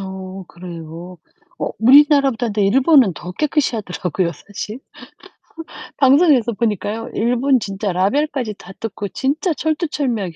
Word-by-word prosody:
어 190 0 -7
그래요. 170 0 -9 0.4
어 - - -1
우리나라보다 270 0 +5
근데 205 -1 0
일본은 260 - +4
더 175 - -8
깨끗이 295 - 0
하더라고요 180 -3 -2
사실. 205 - -8 1.2
방송에서 270 -4 +4
보니까요. 220 +1 -2
일본 245 +3 +2
진짜 195 -1 -3
라벨까지 235 +5 0
다 195 - -13
뜯고 210 -2 -5
진짜 290 - -1
철두철미하게 285 - -2
225 Hz, 315 characters per minute, -19 LUFS, 190-275 Hz, 1.2 s, 우리나라보다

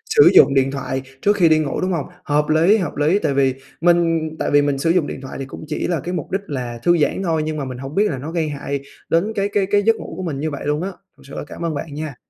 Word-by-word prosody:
sử 440 - +8
dụng 135 - +7
điện 135 0 +2
thoại 130 -1 -3 0.2
trước 205 +1 +3
khi 175 -5 +4
đi 155 0 +4
ngủ, 145 -3 -2
đúng 185 - 0
hông? 160 -5 -2 0.2
Hợp 150 +1 +1
lý, 165 +7 +5
hợp 180 -7 -3
lý, 155 +7 +2
tại 140 - 0
vì 135 -1 +2 0.3
mình 165 -2 +3
tại - - -1
vì 145 0 +5
mình 145 -1 0
sử 165 - +1
dụng 170 -3 +2
điện 135 - -6
thoại 135 - -8
thì 135 - -4
cũng 130 - -9
chỉ 150 - -2
là 170 -4 0
cái 175 +5 -5
mục 180 - -4
đích 195 - 0
là 125 -4 -4
thư 175 0 +4
giãn 155 +5 +1
thôi, 160 -3 0
nhưng 155 0 -3
mà 145 - -3
mình 130 -1 -6
hổng 135 +4 -7
biết 205 +1 +3
là - - -3
nó 145 +5 -6
gây 165 -3 -1
hại 140 -1 -4 0.3
đến 190 +7 +1
cái 200 0 0
cái 205 -1 +1
cái 205 +1 +2
giấc 225 +1 +4
ngủ - - -8
của 185 - -4
mình 150 -6 -3
như 155 +2 -2
vậy 140 - -6
luôn 150 +1 0
á. 190 - -2 0.3
Thật - - -19
sự 140 - -12
là - - -4
cảm 170 - -6
ơn 165 - -1
bạn 145 +1 -5
nha. 150 -2 -5
155 Hz, 305 wpm, -20 LUFS, 140-175 Hz, 0.3 s, sử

